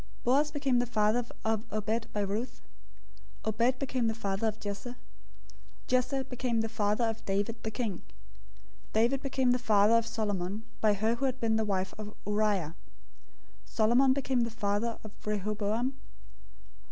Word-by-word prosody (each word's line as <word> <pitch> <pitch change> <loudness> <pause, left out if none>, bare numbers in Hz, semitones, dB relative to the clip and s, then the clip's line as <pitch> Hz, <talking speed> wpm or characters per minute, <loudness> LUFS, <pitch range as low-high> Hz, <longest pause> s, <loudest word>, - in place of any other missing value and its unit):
Boaz 280 +5 +3
became 275 -4 +1
the 245 - 0
father 220 +1 +2 0.2
of 220 -1 +1
Obed 220 +2 -1
by 210 - -1
Ruth. 205 +5 -3 0.9
Obed 235 +4 +2
became 255 -3 0
the 225 - 0
father 200 -1 -1
of 215 0 -2
Jesse. 205 +4 -5
001:006 245 - -8 0.9
Jesse 255 +1 +1
became 250 -3 -1
the 225 - -2
father 210 +1 +1
of 225 0 -1
David 205 +4 -1
the 220 - -3
king. 215 -5 -3 0.9
David 240 +5 +3
became 260 -2 +1
the 250 - +2
father 215 -2 +4
of 230 0 +3
Solomon 210 -3 -2 0.2
by 215 -1 +5
her 220 +3 +1
who 235 +4 -1
had 260 -1 -1
been 225 -1 +2
the 220 - +2
wife 190 -2 -1
of 210 0 -7
Uriah. 205 -6 +1 0.9
001:007 - - -20
Solomon 240 - +4
became 265 -2 +1
the 235 - +1
father 220 +1 -1
of 215 - -8
Rehoboam. 210 +4 -1
225 Hz, 160 wpm, -30 LUFS, 210-245 Hz, 0.9 s, by